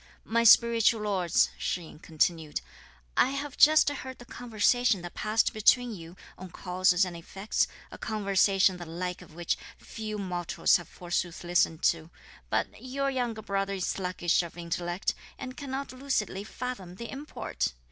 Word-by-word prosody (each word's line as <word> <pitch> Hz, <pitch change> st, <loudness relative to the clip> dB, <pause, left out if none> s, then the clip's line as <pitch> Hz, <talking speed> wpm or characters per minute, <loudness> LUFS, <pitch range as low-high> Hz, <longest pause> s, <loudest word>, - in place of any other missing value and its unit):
"My 230 Hz, +1 st, +2 dB
spiritual 230 Hz, -1 st, +6 dB
lords," 185 Hz, -5 st, +2 dB
Shih 180 Hz, -, -1 dB
yin 155 Hz, -, -12 dB
continued; 160 Hz, -1 st, 0 dB, 0.5 s
"I -, -, +5 dB
have 275 Hz, 0 st, -4 dB
just 310 Hz, +1 st, +7 dB
heard 260 Hz, -2 st, -3 dB
the 245 Hz, -, -12 dB
conversation 235 Hz, -3 st, +1 dB
that 175 Hz, -, -7 dB
passed 215 Hz, +1 st, +1 dB
between 240 Hz, +3 st, +4 dB
you, 170 Hz, -2 st, -10 dB, 0.2 s
on 185 Hz, 0 st, -8 dB
causes 180 Hz, +1 st, +2 dB
and 180 Hz, -2 st, -6 dB
effects, 195 Hz, +5 st, -1 dB, 0.2 s
a -, -, -10 dB
conversation 195 Hz, -3 st, +2 dB
the 175 Hz, -1 st, -8 dB
like 180 Hz, +2 st, -4 dB
of 165 Hz, -3 st, -15 dB
which 175 Hz, -1 st, -1 dB, 0.2 s
few 215 Hz, -1 st, -6 dB
mortals 180 Hz, -3 st, +1 dB
have 175 Hz, -, -10 dB
forsooth 175 Hz, -1 st, -3 dB
listened 175 Hz, -2 st, +1 dB
to; 165 Hz, -1 st, +2 dB, 0.4 s
but -, -, -1 dB
your 275 Hz, +2 st, -1 dB
younger 240 Hz, -4 st, -2 dB
brother 195 Hz, 0 st, -1 dB
is 185 Hz, -, -2 dB
sluggish 180 Hz, -2 st, +1 dB
of 170 Hz, 0 st, -8 dB
intellect, 175 Hz, +1 st, -2 dB, 0.2 s
and 255 Hz, 0 st, -7 dB
cannot 275 Hz, -1 st, -5 dB
lucidly 255 Hz, -7 st, -2 dB
fathom 215 Hz, -6 st, -6 dB
the 235 Hz, +4 st, -7 dB
import! 285 Hz, +3 st, -3 dB
195 Hz, 155 wpm, -29 LUFS, 175-240 Hz, 0.5 s, just